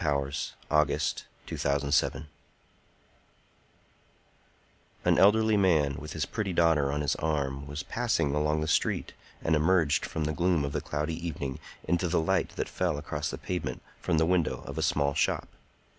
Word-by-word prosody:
THE - - -1
ARTIST 70 0 -1 0.2
OF 75 -1 +5 0.6
THE - - -5
BEAUTIFUL 70 +2 +1 2.8
An - - +4
elderly 110 +2 +5
man, 80 -8 +3
with 75 +1 -7
his 80 -3 -1
pretty 105 -4 -3
daughter 80 -5 +3
on 75 +1 -1
his 70 - +1
arm, 70 -3 -2
was 75 +5 -5
passing 115 -11 0
along 75 +1 +1
the 80 - -1
street, - - 0 0.3
and 80 - +3
emerged 80 -1 +3
from 80 - -3
the 75 +1 -1
gloom 85 -3 +1
of 70 - -3
the - - -2
cloudy 80 +3 -3
evening 70 -5 -4 0.3
into 90 +1 +1
the 85 0 +2
light 80 - +1
that - - -2
fell - - -1
across - - -3
the - - -5
pavement 75 -9 -4 0.2
from 80 - +1
the 80 - +4
window 90 -1 +1
of 70 +2 -5
a - - 0
small 70 -2 +1
shop. - - 0
75 Hz, 165 wpm, -29 LUFS, 70-85 Hz, 2.8 s, OF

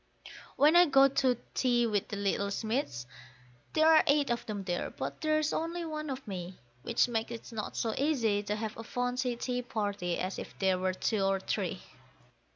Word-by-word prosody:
When 300 +4 +5
I 350 0 +8
go 275 -1 +6
to 255 -2 +2 0.2
tea 240 -2 +2
with 210 -3 0
the - - -5
little 200 0 0
Smiths, 215 - -2 0.7
there 315 0 +4
are 320 -1 +7
eight 285 -2 +3
of 235 - -1
them 205 -3 -4
there, 175 -2 -2
but - - -6
there's 310 -1 +1
only 335 +1 -2
one 305 -1 -4
of 265 -2 -5
me, 185 -2 -6 0.2
Which 235 - +2
makes 225 -2 -2
it 235 +1 -8
not 220 -2 -5
so 225 -2 0
easy 240 -9 +1
to 210 0 -2
have 215 0 -4
a 225 - -6
fancy 245 +1 -1
tea 250 +1 -2
party 205 -7 -2
as 185 +1 -3
if - - -9
there 190 -2 +2
were 185 0 0
two 215 +2 0
or 195 0 +2
three. - - -3
235 Hz, 190 wpm, -31 LUFS, 200-275 Hz, 0.7 s, I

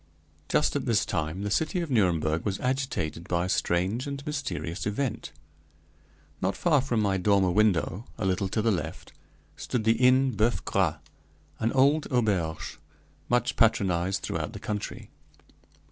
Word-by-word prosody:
Just - - +2
at - - -2
this - - +2
time 80 +5 -2
the 105 - -2
city 160 - +1
of 170 -4 -3
Nuremberg 85 -8 +2
was 100 -2 -2
agitated 125 - -2
by 85 0 0
a - - -4
strange 95 +10 0
and 140 0 -5
mysterious 100 - -3
event. 110 - -2 1.1
Not 95 +1 0
far 155 -6 +3
from 125 -4 -1
my 100 -2 +1
dormer 95 -1 +3
window, 100 0 +1
a 110 - -2
little 95 +1 +1
to 110 +3 -1
the 115 - +3
left, 90 - -4 0.4
stood 120 - -3
the 115 +1 +3
Inn 130 +1 +5
Boeuf 115 +1 0
Gras, 90 -6 +1 0.6
an 115 +1 +1
old 140 +3 +3
auberge 90 -10 -1 0.5
much 120 0 +1
patronized 95 -4 +2
throughout - - -3
the - - -7
country. 105 -1 -5
105 Hz, 150 wpm, -27 LUFS, 90-125 Hz, 1.1 s, Inn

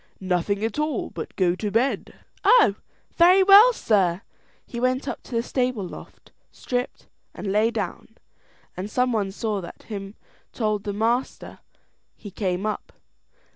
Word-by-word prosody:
"Nothing 190 +2 -1
at 225 +6 -3
all, 300 -4 -2
but - - -6
to - - -29
go 180 -2 +2
to 210 +2 -3
bed." 235 +6 -1 0.3
"Oh, 425 - +6 0.4
very 365 +3 +6
well, 405 +5 +8
sir." 195 - +1 0.4
He 235 - -7
went 255 +3 0
up - - -4
on - - -15
the 230 - +1
stable 250 -7 -1
loft, - - -13 0.2
stripped, 245 0 -4 0.3
and - - -7
lay 215 +3 +3
down, 225 0 -5 0.6
and 185 +3 -5
some 250 +3 +1
one 210 -4 0
that 190 - -8
saw 205 -4 -3
him 200 -1 -7 0.4
told 215 -3 -1
the 205 - -2
master. 230 +5 -2 0.6
He 205 - -11
came 185 0 -2
up. 215 - -4
220 Hz, 155 wpm, -24 LUFS, 200-255 Hz, 0.6 s, well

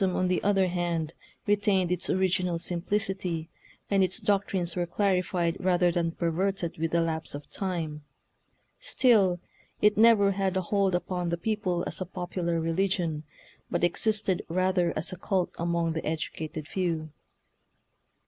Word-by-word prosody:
Shintoism, 185 -2 +1
on 185 - +2
the 180 - +1
other 195 -1 +3
hand, 170 -3 -1 0.3
retained 205 -3 +2
its 180 0 -1
original 180 -2 +1
simplicity, 175 -1 -2 0.4
and 195 -1 +3
its 185 0 0
doctrines 195 -4 0
were 175 -1 -1
clarified 180 -2 +1
rather 180 -1 +3
than 170 -1 0
per 170 -1 -1
verted 185 -1 -1
with 165 0 0
the 170 +1 +2
lapse 160 -2 -2
of 145 - -9
time. 165 -6 -3 0.8
Still, 215 - +3 0.4
it 210 0 +4
never 220 -3 +6
had 190 -1 0
a - - +2
hold 195 0 +1
upon 180 0 -2
the 170 - -1
people 185 -3 -1
as - - -4
a 185 - -2
popular 175 -2 -2
religion, 165 -2 0 0.4
but 175 - -1
existed 200 +1 +1
rather 185 0 +2
as 155 - -1
a 185 - -6
cult 185 0 0
among 170 -1 0
the 160 - -3
educated 155 -1 -4
few. 165 -5 -2
180 Hz, 150 wpm, -28 LUFS, 170-195 Hz, 0.8 s, never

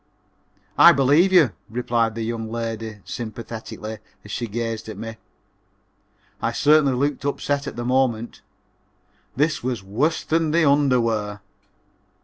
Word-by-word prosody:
C.A."] - - +3
"I - - +11
believe 145 +8 +4
you," 165 - +5 0.2
replied 115 -1 0
the 115 - -3
young 115 -1 -4
lady, 115 -2 -5
sympathetically, 110 -1 -7 0.3
as 105 - -9
she 120 +2 -3
gazed 115 0 -4
at 110 - -7
me. 115 +1 -7 1.2
I - - 0
certainly 150 -2 +4
looked 140 +1 -1
upset 140 0 -1
at - - -6
the 120 0 -4
moment. 125 -3 0 0.9
This 155 +4 +1
was 120 -5 -2
worse 130 +12 0
than 165 0 +1
the 165 +1 +3
underwear. 115 -7 +1
120 Hz, 130 wpm, -22 LUFS, 110-140 Hz, 1.2 s, I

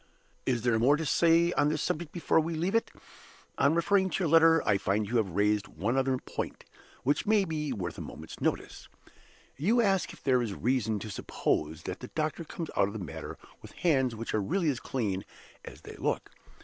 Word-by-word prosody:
"Is 120 -3 +1
there 120 -2 +2
more 135 +6 +5
to 160 - -3
say 170 +3 +4
on 145 0 +2
this 155 0 -1
subject 160 0 -2
before 170 -2 +2
we 165 +1 -1
leave 175 +5 -1
it? 230 - +2 0.7
On 140 +3 +4
referring 190 +3 +3
to 190 - -1
your 165 - +1
letter, 165 0 +5
I 100 -2 +3
find 105 +3 0
you 120 +3 0
have 95 -6 -1
raised 105 0 +2
one 105 +5 -2
other 135 -1 +1
point, - - -6 0.4
which 145 +8 +1
may 210 -2 +4
be 155 -4 -3
worth 95 -8 -4
a - - -5
moment's - - -9
notice. - - -2 0.7
"You 210 - +2
ask 195 -5 +2
if - - -15
there 130 -2 +3
is 110 -5 -3
reason 110 -1 0
to 110 - -6
suppose 80 -3 -2
that 90 - -5
the 125 - -7
doctor 155 +3 -2
comes 165 +1 -6
out 95 - +3
of 100 - -6
the 110 - -5
matter - - -7 0.2
with - - -12
hands 130 -8 +1
which 115 +1 -5
are 110 - +1
really 165 - +1
as 125 - -4
clean 100 -7 -2 0.4
as - - -11
they - - -10
look? - - -2
135 Hz, 210 wpm, -29 LUFS, 110-165 Hz, 0.7 s, more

